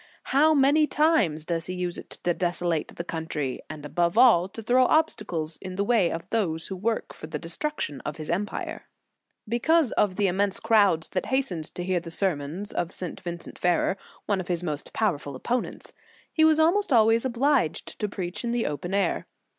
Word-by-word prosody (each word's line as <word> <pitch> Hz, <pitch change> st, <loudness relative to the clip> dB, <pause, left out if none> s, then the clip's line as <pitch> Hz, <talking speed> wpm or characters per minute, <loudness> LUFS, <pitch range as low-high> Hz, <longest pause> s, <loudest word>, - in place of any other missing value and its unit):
How 305 Hz, +3 st, +5 dB
many 290 Hz, +2 st, +4 dB
times 230 Hz, -, +2 dB
does 170 Hz, 0 st, -2 dB
he 185 Hz, -, -4 dB
use 180 Hz, -1 st, -2 dB
it -, -, -12 dB
to 175 Hz, -, +2 dB
desolate 175 Hz, -2 st, -1 dB
the 170 Hz, -, -4 dB
country, 160 Hz, -6 st, -4 dB
and 150 Hz, -1 st, -8 dB
above 170 Hz, +5 st, 0 dB
all, 225 Hz, -8 st, +6 dB
to 225 Hz, +3 st, -9 dB
throw 255 Hz, +3 st, +4 dB
obstacles 170 Hz, -, 0 dB
in 185 Hz, -1 st, -7 dB
the 200 Hz, -, 0 dB
way 205 Hz, -5 st, +3 dB
of 165 Hz, +2 st, -5 dB
those 165 Hz, -8 st, 0 dB
who 190 Hz, -, -4 dB
work 220 Hz, +5 st, -2 dB
for -, -, -9 dB
the 155 Hz, -1 st, -4 dB
destruction 165 Hz, -, -4 dB
of 150 Hz, -, -5 dB
his 155 Hz, -1 st, -6 dB
empire! 200 Hz, +4 st, -3 dB, 0.6 s
Because 270 Hz, +5 st, +2 dB
of 195 Hz, -3 st, +1 dB
the 205 Hz, -, +1 dB
immense 195 Hz, +1 st, +1 dB
crowds 200 Hz, -8 st, +3 dB
that 185 Hz, -, -2 dB
has 265 Hz, +1 st, +1 dB
tened 160 Hz, -4 st, -5 dB
to 180 Hz, -, -3 dB
hear 185 Hz, 0 st, 0 dB
the 170 Hz, 0 st, -9 dB
sermons 170 Hz, +1 st, -2 dB
of 175 Hz, 0 st, -2 dB
St. 180 Hz, -3 st, -4 dB
Vincent 175 Hz, -2 st, -7 dB
Ferrer, 180 Hz, +2 st, +2 dB, 0.3 s
one 200 Hz, -3 st, 0 dB
of 180 Hz, -, -9 dB
his 175 Hz, -1 st, 0 dB
most 150 Hz, -4 st, -3 dB
powerful 150 Hz, -10 st, -1 dB
opponents, 240 Hz, -, -3 dB, 0.4 s
he 315 Hz, -, +3 dB
was 315 Hz, 0 st, +5 dB
almost 345 Hz, +4 st, +3 dB
always 225 Hz, -1 st, +5 dB
obliged 260 Hz, -, 0 dB
to 210 Hz, -, -1 dB
preach 190 Hz, +1 st, -4 dB
in 235 Hz, -, -1 dB
the 240 Hz, -1 st, 0 dB
open 175 Hz, +6 st, -3 dB
air. 195 Hz, -4 st, 0 dB
185 Hz, 195 wpm, -26 LUFS, 170-235 Hz, 0.6 s, all